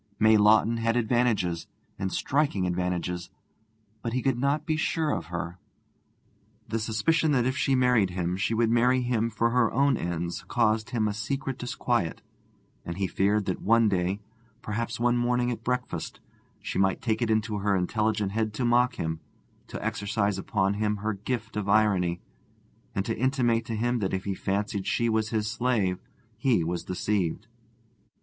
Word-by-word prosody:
May 110 0 +5
Lawton 110 +2 +5
had 115 +1 +1
advantages, 110 -8 +1 0.3
and 95 -1 -2
striking 140 -10 0
advantages, 90 -1 -2 0.7
but 115 0 -3
he 130 - -1
could 135 -3 +1
not 140 +3 +1
be 155 - 0
sure 160 -1 0
of 85 - -3
her. 85 +1 -5 1.1
The 115 +1 -1
suspicion 150 +8 +1
that 125 -3 +2
if 130 0 0
she 135 0 +2
married 125 -6 +3
him 90 0 -2
she 100 +4 0
would 115 0 +2
marry 125 +2 +3
him 115 -2 0
for 115 +2 0
her 125 -2 +3
own 140 -2 +3
ends 85 0 -3
caused 110 +2 +1
him 115 -4 0
a 105 - -1
secret 135 +5 -3
disquiet, 120 -6 -1 0.6
and 85 +1 -6
he 100 - 0
feared 100 +2 +1
that 95 - -2
one 115 +1 +4
day, 95 +1 0 0.4
perhaps 115 +2 -3
one 120 0 +2
morning 120 0 +1
at 115 -1 -5
breakfast, 125 +2 -3 0.4
she - - -2
might 95 0 +2
take 110 -2 -1
it 115 - +1
into 110 -1 0
her 100 0 +1
intelligent 105 +2 0
head 110 0 -1
to 125 - -1
mock 120 +1 +3
him, 80 0 -3 0.5
to - - -6
exercise 100 -1 -1
upon 95 0 0
him 105 0 0
her 105 +2 -2
gift 110 +3 -4
of 105 -2 -2
irony, 95 -5 +2 0.7
and 95 - 0
to 115 - -1
intimate 120 -2 +1
to 115 -1 -3
him 120 +2 0
that 95 -2 -1
if 95 - -4
he 100 - -2
fancied 100 +1 -2
she 115 0 +1
was 110 0 +1
his 110 -2 -1
slave 110 -5 0 0.4
he 115 -8 +2
was 85 +1 -2
deceived. 90 -2 -1
110 Hz, 170 wpm, -27 LUFS, 95-120 Hz, 1.1 s, May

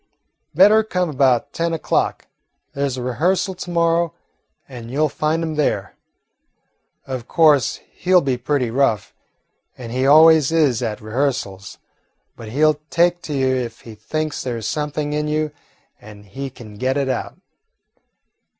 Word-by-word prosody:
"Better 210 +5 +6
come 180 -5 -1
about 130 -4 +1
ten 170 0 -1
o'clock. 160 - -1 0.5
There 140 0 -1
's 130 - -5
a 125 - -4
rehearsal 175 +10 0
to 180 0 -8
morrow, 170 -1 +1 0.5
and 120 -3 -9
you 140 +5 0
'll 155 - +2
find 155 +3 -1
him 160 -1 -3
there. 100 -10 -1 1.1
Of 130 -3 -6
course, 150 -5 +3
he 185 - -5
'll 185 - +8
be 135 -4 0
pretty 125 -1 -1
rough, 120 -5 0 0.6
he 125 +2 -2
always 155 0 +6
is 145 -8 +2
at 110 -3 -3
rehearsals, 110 -5 -3 0.6
but 115 - -10
he 145 +7 +2
'll 150 -1 +2
take 175 +1 +2
to 150 - -6
you 130 -1 +1
if 120 -2 -4
he 115 - -11
thinks 155 +9 -4
there 120 -3 -3
's 110 -1 -3
anything 150 0 -3
in 150 0 -1
you 155 0 -1 0.5
and 105 -1 -13
he 135 +8 -6
can 115 -5 -13
get 130 +4 0
it 140 -1 0
out." 130 - -3
140 Hz, 160 wpm, -20 LUFS, 120-155 Hz, 1.1 s, ll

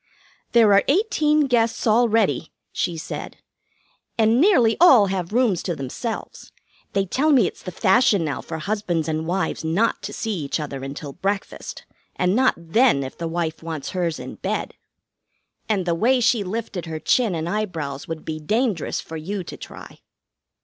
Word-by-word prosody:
"'There 225 -4 +6
are 200 - +5
eighteen 305 -3 +2
guests 235 -5 +1
already,' 225 -5 +2 0.2
she 170 -2 -2
said, 160 - -6 0.8
'and 225 +3 +4
nearly 280 - +5
all 265 - +8
have 185 -2 -3
rooms 230 -6 +2
to 175 - -3
themselves. 155 - -6 0.4
They 195 -1 +1
tell 270 - +1
me 255 -8 +5
it's - - -5
the 185 - -6
fashion 200 -1 +3
now 145 - -3
for 160 - -6
husbands 175 -2 -2
and 160 0 -2
wives 185 0 -1
not 175 +9 +1
to - - -6
see 225 -1 -3
each 145 +1 -2
other 140 -3 -5
until 140 +1 -6
breakfast, 195 +4 -4 0.3
and 180 +2 +1
not 260 +2 +3
then 170 - +2
if 130 - -7
the 165 - -4
wife 165 -1 -3
wants 160 -3 -5
hers 175 -3 -1
in - - -8
bed.' - - -3 1.0
And 200 -4 +1
the 170 - +1
way 240 +9 +3
she 230 -2 +2
lifted 195 -3 -4
her 160 -1 -4
chin 225 +1 +2
and 160 0 -3
eyebrows 165 -9 -3
would 165 -1 -6
be 155 -1 -4
dangerous 210 - -1
for 160 - -8
you 190 +5 -4
to - - -8
try. - - -11
195 Hz, 170 wpm, -22 LUFS, 160-230 Hz, 1.0 s, all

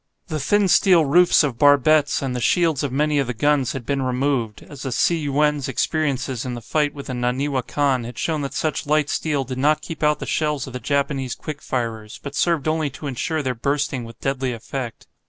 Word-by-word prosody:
The 155 -2 -2
thin 205 +8 +2
steel 180 -3 +5
roofs 175 +4 +5
of 130 -5 -2
barbettes, 145 +1 +4
and 130 -2 -2
the 125 - -2
shields 165 -1 +2
of 145 -3 -2
many 150 +2 +1
of 135 - 0
the 125 - -3
guns, 145 +1 +1
had 130 -3 -6
been 140 +1 -1
removed, 130 -3 -1
as 145 -2 -11
the 135 - -3
"Tsi 170 - +2
yuen's" 150 -1 +1
experiences 135 -3 -1
in 125 -1 -4
the - - -5
fight 150 +2 0
with 140 - -8
the 130 - -5
"Naniwa 130 +3 -1
Kan" 140 -4 +1
had 120 0 -8
shown 160 -2 -1
that 140 - -5
such 155 -2 -2
light 150 0 +2
steel 150 -4 0
did 130 0 -6
not 150 +2 +2
keep 165 - -7
out 150 0 +3
the - - -6
shells 150 -3 -1
of 130 - -10
the 125 - -4
Japanese 135 0 -1
quick 150 -2 -7
firers, 115 -4 -4
but 140 - -6
served 160 -1 +1
only 155 -1 +1
to 135 +3 -10
ensure 145 +4 -2
their 130 -1 -1
bursting 140 +1 -1
with 115 0 -11
deadly 135 -2 -1
effect. 120 +1 -6
140 Hz, 220 wpm, -22 LUFS, 130-150 Hz, -, steel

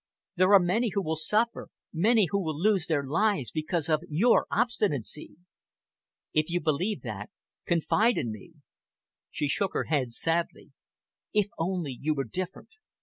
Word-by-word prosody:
There 185 +1 +4
are - - +9
many 200 +7 +1
who 200 - +1
will 160 -1 -1
suffer, 215 +9 0 0.2
many 210 +5 +4
who 200 - +1
will 155 -2 -3
lose 195 -2 +2
their 150 -4 +1
lives 165 - +1
because 155 0 -2
of 155 -2 +2
your 195 +11 +3
obstinacy." 170 - -1 1.0
"If 155 +1 +1
you 175 +1 0
believe 175 +6 -1
that, 105 -4 -6 0.4
confide 205 +7 +2
in 115 - -1
me." 110 +10 -11 0.8
She 145 - -2
shook 190 +7 0
her - - +1
head 135 -6 -1
sadly. 165 +6 -1 0.6
"If 210 -2 +2
only 170 -3 -1
you 155 +1 0
were 135 - -1
different!" 180 - -5
170 Hz, 150 wpm, -28 LUFS, 150-200 Hz, 1.0 s, are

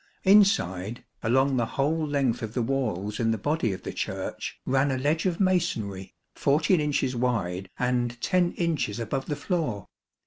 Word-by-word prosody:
Inside, 125 - +3 0.2
along 130 +3 +2
the 120 -2 +1
whole 155 +3 +1
length 140 -5 0
of 110 0 -5
the 120 - +1
walls 110 -6 -2
in 115 -1 +1
the 115 - +1
body 145 0 0
of 95 - -6
the - - -5
Church, - - -4
ran 135 +2 +2
a 130 - 0
ledge 155 +7 +1
of 175 -2 -1
masonry, 115 - 0 0.2
14 155 +4 +2
inches 145 -3 0
wide 100 -7 -1
and 120 -1 0
10 180 +5 +1
inches 155 - -1
above 135 +4 -3
the 150 - -1
floor. 145 - -2
130 Hz, 165 wpm, -27 LUFS, 115-155 Hz, 0.2 s, Inside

